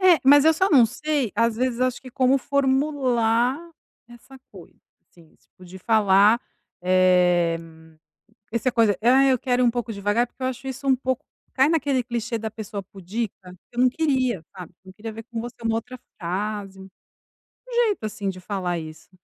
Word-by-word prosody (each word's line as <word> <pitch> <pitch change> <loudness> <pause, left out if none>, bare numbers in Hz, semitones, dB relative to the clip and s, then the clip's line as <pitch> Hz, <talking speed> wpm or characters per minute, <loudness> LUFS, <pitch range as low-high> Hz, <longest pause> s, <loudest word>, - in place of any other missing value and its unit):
É, 365 -3 +6
mas 285 +1 +7
eu 320 0 +5
só 380 +3 +1
não 255 -7 +6
sei, 285 -1 -2
às 230 +1 +1
vezes 250 0 -1
acho 255 -1 0
que 255 - -12
como 265 +1 +2
formular 265 -3 +1 0.5
essa 240 +3 -15
coisa, - - -15 0.3
assim, 165 -3 -21
tipo 185 - -21
de 185 +2 -11
falar, 210 +2 +4 0.4
eh, 180 -2 +3 0.9
essa 235 +2 0
coisa: 225 -4 +3
"Ah, 260 +4 +5
eu 260 -1 +3
quero 250 +1 0
ir - - +4
um 240 - +4
pouco 235 -2 -4
devagar", 205 +4 0
porque 250 +2 -15
eu - - 0
acho 260 +1 -7
isso 270 +2 -7
um 265 - +4
pouco 260 0 -3 0.3
cai 265 +2 +4
naquele 285 -5 +1
clichê 235 -1 -3
da 220 0 -5
pessoa 210 -2 -7
pudica. 195 0 -7 0.2
Eu 240 - -2
não 255 - +5
queria, 255 - 0
sabe, 180 -2 -9
eu 185 - -13
queria 220 +1 -7
ver 225 +1 -8
com 235 -1 -6
você 240 +1 -7
uma 225 0 +1
outra 255 +2 -6 0.2
frase, 195 +2 -4
um 190 - -11 1.0
jeito, 410 - -2
assim, 210 -2 -4
de 185 -1 -6
falar 180 -2 -3
isso. 155 0 -11
235 Hz, 180 wpm, -23 LUFS, 200-260 Hz, 1.0 s, mas